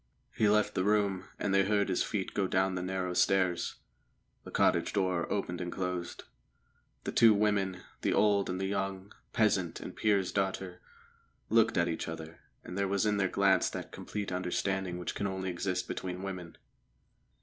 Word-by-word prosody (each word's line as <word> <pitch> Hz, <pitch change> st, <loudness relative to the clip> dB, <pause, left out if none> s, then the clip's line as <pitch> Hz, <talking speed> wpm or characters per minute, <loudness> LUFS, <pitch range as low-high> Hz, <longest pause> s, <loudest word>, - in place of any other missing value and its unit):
He 105 Hz, -, +3 dB
left 105 Hz, 0 st, +3 dB
the 95 Hz, -, 0 dB
room, 100 Hz, -2 st, +1 dB
and 100 Hz, -, -1 dB
they 95 Hz, 0 st, +5 dB
heard 100 Hz, +1 st, +2 dB
his 95 Hz, -, +1 dB
feet 100 Hz, -4 st, -2 dB
go 100 Hz, -2 st, +1 dB
down 95 Hz, +1 st, +1 dB
the 90 Hz, -, -2 dB
narrow 90 Hz, 0 st, -2 dB
stairs. 90 Hz, -1 st, +2 dB, 0.7 s
The -, -, -10 dB
cottage -, -, +2 dB
door 95 Hz, -3 st, 0 dB
opened 90 Hz, -3 st, -2 dB
and 90 Hz, 0 st, -3 dB
closed. 90 Hz, -2 st, -4 dB, 0.8 s
The -, -, -3 dB
two 115 Hz, -2 st, +6 dB
women, 100 Hz, -3 st, +1 dB, 0.2 s
the -, -, +1 dB
old 100 Hz, -2 st, +3 dB
and 90 Hz, +1 st, -2 dB
the 95 Hz, -, -1 dB
young, 95 Hz, 0 st, -3 dB, 0.2 s
peasant 95 Hz, -6 st, +1 dB
and -, -, -8 dB
peer's 100 Hz, -4 st, +2 dB
daughter, 95 Hz, -2 st, -2 dB, 0.7 s
looked 115 Hz, -2 st, +4 dB
at 85 Hz, 0 st, +3 dB
each 80 Hz, -, -3 dB
other, 80 Hz, 0 st, -7 dB, 0.2 s
and 90 Hz, -, -8 dB
there 100 Hz, 0 st, 0 dB
was 100 Hz, +1 st, +1 dB
in 105 Hz, -1 st, +2 dB
their 95 Hz, -2 st, +1 dB
glance 100 Hz, 0 st, +3 dB
that -, -, -6 dB
complete 105 Hz, -2 st, -5 dB
understanding 90 Hz, 0 st, -1 dB
which 90 Hz, -, -4 dB
can 100 Hz, -, -2 dB
only 95 Hz, -1 st, -3 dB
exist 90 Hz, +1 st, -2 dB
between 90 Hz, 0 st, -4 dB
women. 90 Hz, -4 st, -6 dB
95 Hz, 175 wpm, -31 LUFS, 90-100 Hz, 0.8 s, two